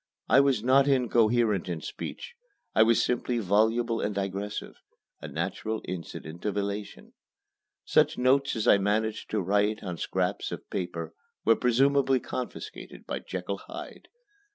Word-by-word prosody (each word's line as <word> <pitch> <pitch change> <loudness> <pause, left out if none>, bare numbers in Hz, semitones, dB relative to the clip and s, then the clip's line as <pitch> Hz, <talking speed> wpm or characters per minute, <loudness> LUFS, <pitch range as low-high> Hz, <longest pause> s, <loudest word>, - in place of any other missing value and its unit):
I 135 - +6
was 135 -6 +3
not 135 +3 +5
incoherent 115 -6 +2
in 85 -2 -2
speech. 480 -1 -7 0.4
I - - +4
was 115 +1 +5
simply 125 0 0
voluble 115 +3 +2
and 105 - -2
digressive 100 +1 -3 0.5
a - - -6
natural 110 0 -3
incident 85 -2 -7
of 105 -1 -1
elation. 100 +1 -4 0.7
Such - - +3
notes 135 +2 +3
as 110 - -1
I 100 - +6
managed 105 +2 -1
to 105 - 0
write 105 +3 +1
on 90 -3 -4
scraps - - -1
of - - -7
paper 85 -3 -4 0.3
were 115 - +6
presumably 135 +3 +3
confiscated 125 0 -7
by - - -3
Jekyll - - -5
Hyde. - - -9
110 Hz, 140 wpm, -28 LUFS, 100-125 Hz, 0.7 s, I